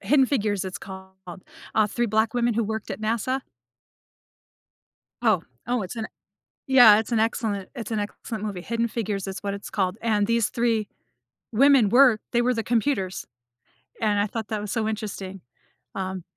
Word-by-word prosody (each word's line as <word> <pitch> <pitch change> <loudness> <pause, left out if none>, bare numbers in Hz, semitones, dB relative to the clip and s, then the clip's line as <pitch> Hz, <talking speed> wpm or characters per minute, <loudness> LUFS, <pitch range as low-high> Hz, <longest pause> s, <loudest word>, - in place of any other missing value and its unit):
Hidden 275 -2 +4
Figures, 210 -7 0
it's 190 +1 -5
called. 190 -1 -10 0.6
Uh, 215 -1 +4
3 240 +3 -1
black 220 +1 +1
women 240 -2 +1
who 230 - +1
worked 220 +1 -4
at - - -5
NASA? 230 +4 -1 1.8
Oh, 215 -7 +3 0.2
oh, 245 -2 0
it's 190 +5 -7
an 225 - -3 0.4
e 265 - -6
yeah, 220 -5 +9
it's 225 - -5
an 230 - +2
excellent 220 -3 -1
it's 230 -1 -6
an 215 - 0
excellent 210 +1 -5
movie. 200 -4 -4
Hidden 230 +3 -1
Figures 210 -4 -3
is 190 - -5
what 200 -1 -3
it's 200 0 -7
called, 190 0 -1
and 215 -3 +2
these 230 -2 +2
3 230 -3 0 0.6
women 260 -1 +5
were 245 -1 +6
they 240 - +2
were 250 +1 +2
the 225 -2 -2
computers, 225 -6 -1 0.8
and 210 -2 +2
I 205 - +2
thought 220 +1 -5
that 215 -1 -2
was 210 - -5
so 220 -2 0
interesting. 195 -3 -5 0.5
Um. 190 -2 -4
220 Hz, 175 wpm, -25 LUFS, 200-235 Hz, 1.8 s, yeah